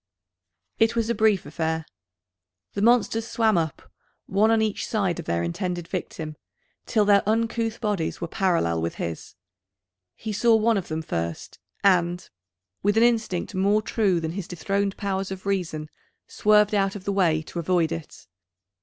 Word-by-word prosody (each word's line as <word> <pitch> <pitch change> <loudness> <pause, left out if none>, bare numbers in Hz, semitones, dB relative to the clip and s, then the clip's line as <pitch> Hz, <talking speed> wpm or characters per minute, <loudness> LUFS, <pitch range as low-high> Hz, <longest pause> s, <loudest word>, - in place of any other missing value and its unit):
It 225 +1 +3
was 230 0 +1
a - - +2
brief 215 -4 +2
affair. 160 +1 -2 0.9
The 200 - -2
monsters 225 0 +3
swam 220 -3 +2
up, 160 -3 -1 0.4
one 205 +3 +2
on 225 0 +4
each 215 -2 -1
side 195 -6 0
of - - -6
their 85 0 0
intended 175 - -3
victim, 160 -4 -5 0.5
till 215 -3 +2
their 200 -1 +5
uncouth 225 0 0
bodies 205 -8 -1
were 170 - -3
parallel 165 - +1
with 85 - -2
his. 85 -1 -5 0.8
He 220 -1 -5
saw 225 +2 +4
one 220 0 +3
of 190 - -3
them 160 0 -3
first, 85 - -4 0.2
and, 180 -2 +2 0.5
with 205 +2 +2
an 225 - +6
instinct 225 -4 +1
more 200 +3 +2
true 200 -6 +1
than 160 -1 -3
his 180 0 -5
dethroned 195 +3 -1
powers 195 -2 -2
of 190 0 -7
reason, 175 -6 -2 0.4
swerved 210 0 +3
out 195 -1 +1
of 200 - -7
the 200 - -1
way 165 -5 +2
to 170 - -6
avoid 170 -1 +1
it. 165 -2 -7
195 Hz, 165 wpm, -25 LUFS, 165-215 Hz, 0.9 s, an